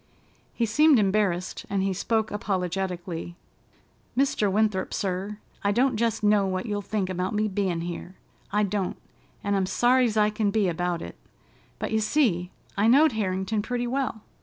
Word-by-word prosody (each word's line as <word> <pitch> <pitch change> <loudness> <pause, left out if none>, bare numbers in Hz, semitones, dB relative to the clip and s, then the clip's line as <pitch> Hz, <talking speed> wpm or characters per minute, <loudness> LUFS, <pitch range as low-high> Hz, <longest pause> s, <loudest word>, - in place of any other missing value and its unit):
He 235 - +1
seemed 295 +6 +5
embarrassed 195 -3 +1
and 195 -1 0
he 195 0 0
spoke 220 +3 0
apologetically: 180 -3 -3 0.8
"Mr. 255 -7 +2
Winthrop, 210 -2 +1
sir, 195 +2 -2 0.3
I 200 - +2
don't 250 +4 +2
jest 225 -1 0
know 205 -1 +4
what 185 0 -2
you'll 205 -2 -2
think 200 -1 -2
about 185 +2 -2
me 215 +1 +1
bein' 190 -4 -1
here—I 185 +4 -5
don't, 200 -2 -1 0.5
and 200 0 +1
I'm 190 -1 +1
sorry's 245 0 +3
I 210 0 +4
can 210 -1 0
be 205 -1 +2
about 175 0 -1
it; - - -9 0.6
but, - - -4
you 220 - +2
see, 215 - +1 0.3
I 205 +2 +2
knowed 285 +6 +6
Harrington 200 -1 -1
pretty 245 +2 -2
well. 250 -3 -2
205 Hz, 160 wpm, -26 LUFS, 185-220 Hz, 0.8 s, knowed